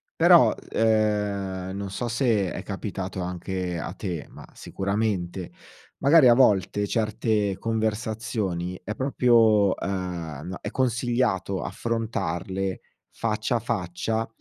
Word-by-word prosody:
però, - - +6 0.2
ehm, 105 -4 0
non 100 -1 -5
so 120 +5 -3
se 115 -6 +1
è - - -5
capitato 95 -2 -5
anche 90 0 -3
a - - -5
te, 90 -7 -5
ma - - -11
sicuramente, 95 -3 -2 0.5
magari 145 0 +6
a 120 - +8
volte, 105 -4 +3
certe 105 -2 0
conversazioni 110 -5 -2
è 105 +3 -4
proprio, 115 -6 +4
ehm, 90 -6 -4
n 95 - -4
è - - -5
consigliato 120 -6 0
affrontarle 95 -5 -2 0.3
faccia 110 +1 -1
a - - -2
faccia 110 0 -2
105 Hz, 110 wpm, -25 LUFS, 95-115 Hz, 0.5 s, a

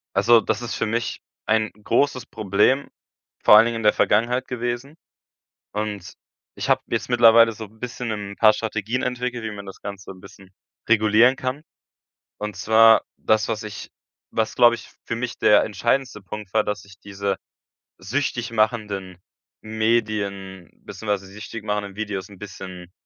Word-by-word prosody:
Also, 115 -1 +5
das 110 +3 -2
ist 120 - -4
für - - -1
mich 115 +2 -2 0.2
ein 110 0 +1
großes 125 +2 +1
Problem 110 +6 +1 0.5
vor 105 - +8
allen 110 +2 +8
Dingen 115 -1 -2
in 115 - -5
der 105 - +5
Vergangenheit 120 +4 +1
gewesen 120 +4 -4 0.8
und 105 -4 -4 0.4
ich - - -4
habe - - +3
jetzt - - -2
mittlerweile 115 -1 +6
so 110 0 -8
'n 110 +2 -20
bisschen 125 -2 -5
'n 100 -1 -5
paar 110 -1 +6
Strategien 110 +2 -3
entwickelt, 125 -1 -3
wie 110 - -3
man 100 -1 -8
das 95 - -11
Ganze 100 -2 -8
'n 95 - -14
bisschen 95 0 -15 0.4
regulieren 110 +3 +5
kann. 130 +3 -4 0.7
Und 105 -2 -5
zwar, 110 +3 +5
das, 110 0 +1
was 110 -1 -3
ich 105 -4 -8 0.4
was, 110 -1 -1
glaube 120 -1 +6
ich, - - -12
für 115 - -3
mich 120 0 -4
der 105 -1 +5
entscheidendste 120 +1 -1
Punkt 100 0 -9
war, 110 -1 +3
dass 105 -2 -4
ich 100 0 -16
diese 100 -1 -3 0.6
süchtig 120 +3 -2
machenden 105 -5 -1 0.4
Medien, 105 -5 -2 0.2
beziehungsweise 100 -3 -3
süchtig 105 +1 -8
machenden 105 -2 -3
Videos 105 -3 -4
'n 100 - -14
bisschen 90 -3 -9
110 Hz, 160 wpm, -23 LUFS, 100-115 Hz, 0.8 s, vor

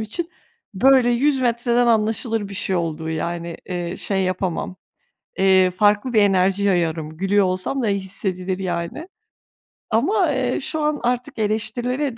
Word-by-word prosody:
için, 330 +11 -4 0.4
böyle, 260 +3 +5
100 265 +3 +2
metreden 240 0 +1
anlaşılır 225 -1 +1
bir 200 - -8
şey 190 -1 -1
olduğu, 160 -2 -3
yani, 170 +1 -4
eee, 175 -1 -4
şey 195 -1 -1
yapamam, 185 0 -2 0.6
eee, 190 -1 +4
farklı 205 +6 +2
bir 215 - +5
enerji 195 0 +2
yayarım, 165 -5 0
gülüyor 195 +3 +2
olsam 185 +9 -2
da 225 - +1
ya 200 - +2
hissedilir, 185 -1 -3
yani. 180 - -4 0.8
Ama, 330 - +2
eee, 255 -2 -1
şu 310 +3 -3
an 300 -1 0
artık 250 +2 -2
eleştirilere 240 +5 -1
205 Hz, 145 wpm, -21 LUFS, 185-245 Hz, 0.8 s, böyle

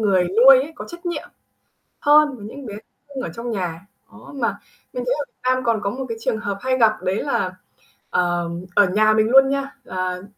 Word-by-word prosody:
người 195 -4 +3
nuôi 240 +9 +7
ấy 305 - -8
có - - -7
trách 345 0 -10
nhiệm 345 - -4 0.7
hơn 295 -1 +4
với 205 -3 -10
những 270 +3 -9
bé 205 - -7
thú 210 - -8 0.3
cưng 265 - -4
ở - - -4
trong 235 +1 -5
nhà. 180 -6 -3 0.3
Đó, - - -14
mà 230 -7 -1 0.4
mình 250 - -4
thấy 255 - +2
ở 285 - -2
Việt - - -46
Nam 255 0 +1
còn 230 -3 +1
có 200 - -1
một 265 +5 -5
cái 230 -1 -5
trường 220 - -1
hợp 200 -1 -3
hay 260 0 0
gặp, 215 -2 +3
đấy 185 +2 0
là, 190 -10 -1 0.6
ờ, 175 -1 0 0.3
ở 205 - +6
nhà 215 +3 +3
mình 215 0 +2
luôn 270 +2 +6
nha, 275 0 -2
ờ, 185 0 -3
225 Hz, 225 wpm, -21 LUFS, 195-265 Hz, 0.7 s, nuôi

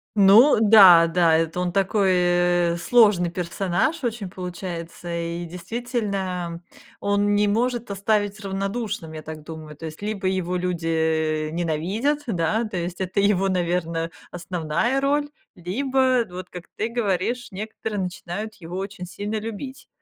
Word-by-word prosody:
Ну 210 +7 +7
да, 200 -6 +8
да, 165 -1 +3
это 165 +1 -1
он 180 -1 -1
такой, 195 +1 +2 0.6
э, - - -3
сложный 205 -2 +4
персонаж 185 - -1
очень 230 -4 -2
получается, 175 -2 -7
и, 170 +1 -3
действительно, 185 -2 -4 0.4
он 205 0 +1
не 205 0 +3
может 240 +1 0
оставить 205 +1 0
равнодушным, 195 -3 -4
я 155 - -7
так 155 0 -9
думаю. 155 -1 -9
То 165 - -8
есть, 160 +2 -8
либо 205 -1 -4
его 185 -1 -1
люди, 175 -2 -2
э, 160 -1 0
ненавидят, 180 - -1
да, 215 +1 0
то 215 -3 -7
есть, 175 0 -4
это 190 +2 -1
его, 195 -1 +2
наверно, 170 -2 -1 0.2
основная 175 - -1
роль, 290 +1 +1 0.2
либо 255 +6 +1
вот, 180 0 -8
как 180 -1 -9
ты 220 - -2
говоришь, 235 +1 -1
некоторые 210 +1 -5
начинают 190 +4 -5
его 170 +1 -8
очень 195 -1 -5
сильно 205 +4 -5
любить. 225 +5 -7
190 Hz, 140 wpm, -23 LUFS, 170-215 Hz, 0.6 s, да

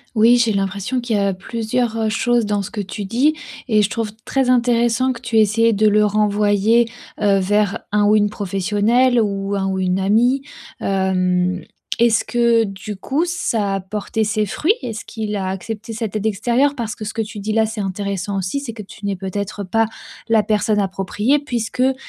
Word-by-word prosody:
Oui, 230 +3 +6
j'ai 230 -2 +2
l'impression 200 +5 -1
qu'il 235 -3 -1
y - - +1
a 200 -1 +1
plusieurs, 225 +3 -2
heu, 220 -1 0
choses 240 +1 +1
dans 205 -1 0
ce - - -7
que 210 -3 -3
tu 200 +1 -6
dis 265 +9 +2 0.3
et 215 -3 +3
je 200 - +1
trouve 225 -3 -2
très 265 -2 +1
intéressant 240 +1 +2
que 235 - -11
tu 230 -2 -1
aies - - +7
essayé 225 +2 +3
de 215 0 +3
le 210 0 +4
renvoyer, 210 +2 +2 0.3
heu, 200 -2 +4
vers 205 +1 +1
un 205 0 +3
ou 210 - +5
une 210 -1 +3
professionnelle, 210 +6 +1
ou 200 -1 -1
un 195 -1 -1
ou 190 0 -1
une 185 0 0
amie. 235 +7 +3 0.4
Hem, 185 -1 +1 0.4
est-ce 235 -2 +4
que 235 -1 +3
du 195 0 -6
coup, 275 - -1
ça 225 - -1
a - - -1
porté 210 +3 -3
ses 210 0 0
fruits? 305 - +1
Est-ce 225 -3 -5
qu'il 215 -2 -4
a 190 -2 -2
accepté 220 +4 -5
cette 220 -2 -4
aide 215 0 -2
extérieure? 240 +7 +2
Parce 230 -4 -4
que - - -8
ce 210 - -5
que 225 - -1
tu 215 -1 -6
dis-là 215 +2 +1
c'est 220 -1 -4
intéressant 195 0 -3
aussi, 190 +9 -2
c'est 265 -5 -5
que 220 -1 -8
tu 200 +1 -11
n'es 200 -1 -1
peut-être 200 +2 -4
pas 225 +5 +2 0.4
la 225 -1 +5
personne 210 0 +1
appropriée 205 +7 0
puisqu'il 255 -1 -1
215 Hz, 200 wpm, -19 LUFS, 200-230 Hz, 0.4 s, aies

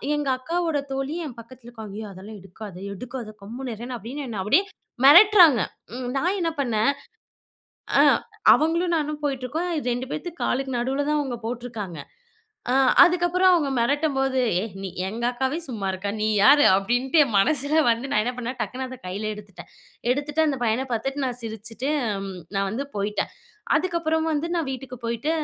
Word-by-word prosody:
எங்க 295 -1 -2
அக்காவோட 330 +3 -1
தோழி 270 +3 -2
என் 255 -5 -7
பக்கத்துல 240 +1 -13
ஒக்காந்து. 215 -3 -9
"ஐயோ! 215 - -6
அதெல்லாம் 200 +3 -10
எடுக்காத, 195 +1 -10 0.2
எடுக்காத 235 0 -7
கம்முனறேன்னு" 240 +2 -6
அப்டின்னு 260 +6 -6
என்ன 210 -4 -3
அப்டியே 290 - +4 0.4
மெரட்றாங்க, 335 - +8 0.3
ம் 250 -1 -4
நான் 360 +8 0
என்ன 330 -1 0
பண்ணேன்? 230 0 +2 1.1
அ - - +8 0.5
அவங்களும் 335 +2 +1
நானும் 300 0 -4
போயிட்டுருக்கோம், 280 +5 -2
அ - - -1 0.2
2 250 +2 -4
பேத்து 335 +3 -4
காலுக்கு 265 0 -1
நடுவுல 270 +4 -1
தான் 300 - +2
அவங்க 255 -4 -3
போட்ருக்காங்க. 230 -8 -5 0.7
அ - - +2 0.3
அதுக்கப்புறம் 355 +1 +3
அவங்க 305 -6 +2
மெரட்டும்போது 270 +1 +1 0.2
"ஏய்! 225 - -4
நீ 195 - -4 0.2
எங்க 230 +4 -5
அக்காவே 265 +5 -1
சும்மா 215 -7 -4
இருக்கா, 190 +2 -4
நீ 215 - +1 0.2
யாரு?" 290 +3 +7
அப்டின்ட்டு 245 - 0
என் 235 -6 -4
மனசுல 290 +7 +2
வந்து 230 +2 +1
நான் 215 - +3
என்ன 250 - -1
பண்ணேன் 250 +1 -4
டக்குனு 255 +5 -4
அத 260 - -8
கையில 200 +4 -4
எடுத்துட்டேன். 205 -3 -12 0.4
எடுத்துட்டு, 290 +3 0
அந்த 275 -2 0
பையன 235 +3 +1
பாத்துட்டு 270 +5 -2
நான் 245 -1 -3
சிரிச்சுட்டு, 225 +4 -5 0.7
நான் 195 0 +1
வந்து 250 +7 -3
போய்ட்டேன். 205 +1 -1 0.5
அதுக்கப்புறம் 330 -3 0
வந்து 305 +3 -1
நான் 320 -5 -1
வீட்டுக்கு 255 -2 -7
போய்ட்டு, 235 +6 -2
255 Hz, 160 wpm, -24 LUFS, 225-295 Hz, 1.1 s, மெரட்றாங்க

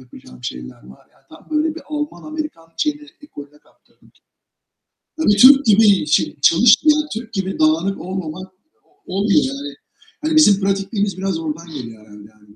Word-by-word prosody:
yapacağım 65 - -16
şeyler 60 0 -8
var, 65 +1 -17
yani 135 - -31
tam 160 - -17
böyle 310 +1 0
bir 335 - -10
Alman 295 -1 -5
Amerikan 305 - -7
şeyini 300 -1 -2
ekolüne 150 - -13
kaptırdım. - - -29 1.1
Tabii 210 -10 +2
Türk 270 +4 +7
gibi 205 -4 +4
şey 150 - 0
çalışmayan, 300 - +4
Türk 225 0 -8
gibi 190 -3 -4
dağınık 165 +5 +1
olmamak 185 0 -7 0.5
olmuyor 200 +8 +1
yani. 280 +2 -6 0.5
Hani 310 0 -1
bizim 210 -11 +5
pratikliğimiz 195 0 -2
biraz 190 -3 -3
oradan 165 +1 -6
geliyor 115 -5 -9
herhâlde 105 0 -15
yani. 105 -1 -23
195 Hz, 150 wpm, -18 LUFS, -, 1.1 s, Türk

